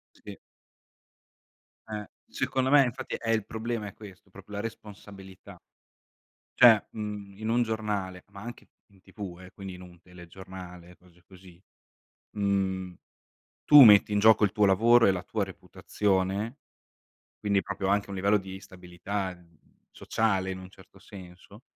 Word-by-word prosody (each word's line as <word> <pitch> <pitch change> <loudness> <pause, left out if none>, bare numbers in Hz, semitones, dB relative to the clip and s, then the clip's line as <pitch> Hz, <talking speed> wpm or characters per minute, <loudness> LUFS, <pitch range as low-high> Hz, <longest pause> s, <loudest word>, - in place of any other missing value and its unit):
Sì. - - -11 1.5
Eh, 105 -2 -6 0.2
secondo 130 0 -1
me 145 -1 +6
infatti 130 +1 -5
eh, 115 -1 -2
il 110 -2 0
problema 110 0 -4
è 100 - -9
questo, 95 -2 -14
proprio 100 +2 -13
la 100 - -3
responsabilità. 100 -3 -10 1.0
Cioè, 115 -4 +7
mhmm, 105 -2 -7
in 110 0 -5
un 120 +2 +2
giornale, 105 -5 -3
ma 100 0 -12
anche 120 +1 -10 0.2
in 100 -2 -24
TV 95 -2 -9
eh, 95 0 -13
quindi 95 -2 -9
in 90 - -12
un 90 -1 -15
telegiornale, 90 0 -12
cose 90 -1 -24
così, 90 -1 -17 0.7
mhmm, 95 -3 -1 0.7
tu 150 -1 +9
metti 105 -2 +7
in 105 - +1
gioco 110 0 +5
il 100 - +3
tuo 105 0 +2
lavoro 115 +5 +5
e - - +5
la 90 -1 -4
tua 110 -2 -2
reputazione, 95 +4 -2 0.8
quindi 100 -2 0
proprio 95 - -4
anche 100 0 0
un 100 - -5
livello 100 +2 +2
di 95 -1 -9
stabilità, 95 +1 -6
ehm, 85 -3 -20 0.3
sociale 100 -4 -1
in 95 - -5
un 95 0 -11
certo 95 0 -19
senso; 95 +2 -14
100 Hz, 150 wpm, -27 LUFS, 95-105 Hz, 1.5 s, tu